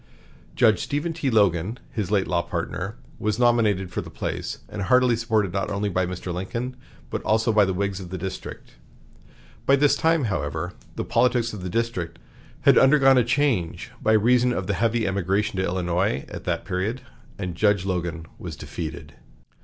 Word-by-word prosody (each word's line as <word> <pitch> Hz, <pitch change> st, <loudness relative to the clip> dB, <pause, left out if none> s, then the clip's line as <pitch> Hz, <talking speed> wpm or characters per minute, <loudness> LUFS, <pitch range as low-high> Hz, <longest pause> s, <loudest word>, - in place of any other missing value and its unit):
Judge 110 Hz, -4 st, +4 dB
Stephen 150 Hz, +4 st, -2 dB
T. 155 Hz, -4 st, -1 dB
Logan, 100 Hz, -1 st, +2 dB
his 105 Hz, -5 st, -3 dB
late 100 Hz, -2 st, +2 dB
law 85 Hz, -1 st, +1 dB
partner, 95 Hz, +5 st, -4 dB, 0.2 s
was 105 Hz, 0 st, 0 dB
nominated 110 Hz, -6 st, +2 dB
for -, -, -2 dB
the -, -, -9 dB
place, -, -, -4 dB
and 105 Hz, -, -6 dB
heartily 125 Hz, +4 st, +4 dB
supported 110 Hz, -5 st, 0 dB
not 100 Hz, 0 st, -1 dB
only 100 Hz, 0 st, -1 dB
by 90 Hz, -1 st, 0 dB
Mr. 90 Hz, 0 st, -5 dB
Lincoln, 115 Hz, +8 st, -4 dB, 0.4 s
but -, -, -2 dB
also 110 Hz, +1 st, +2 dB
by 105 Hz, -1 st, +5 dB
the 95 Hz, -, -1 dB
Whigs 100 Hz, 0 st, -1 dB
of 90 Hz, -2 st, -8 dB
the 95 Hz, -, -4 dB
district. 95 Hz, +2 st, -7 dB, 1.0 s
By 140 Hz, -, +7 dB
this 145 Hz, 0 st, +4 dB
time, 165 Hz, 0 st, +2 dB
however, 75 Hz, -, -2 dB, 0.2 s
the -, -, -3 dB
politics 120 Hz, -2 st, +2 dB
of 105 Hz, -, -6 dB
the 90 Hz, -, -4 dB
district 90 Hz, -6 st, -2 dB, 0.4 s
had -, -, +6 dB
undergone 135 Hz, -1 st, +6 dB
a -, -, +4 dB
change 120 Hz, -, 0 dB
by 110 Hz, -, +3 dB
reason 125 Hz, +3 st, +4 dB
of -, -, -2 dB
the 100 Hz, -, -1 dB
heavy 115 Hz, +4 st, +1 dB
emigration 100 Hz, +2 st, 0 dB
to 95 Hz, -, +1 dB
Illinois 90 Hz, -5 st, 0 dB
at -, -, -8 dB
that -, -, -1 dB
period, 100 Hz, +8 st, -2 dB, 0.4 s
and 90 Hz, -3 st, -4 dB
Judge 100 Hz, +1 st, +2 dB
Logan 85 Hz, -3 st, -2 dB
was -, -, -6 dB
defeated. 80 Hz, -3 st, -7 dB
105 Hz, 175 wpm, -24 LUFS, 90-120 Hz, 1.0 s, By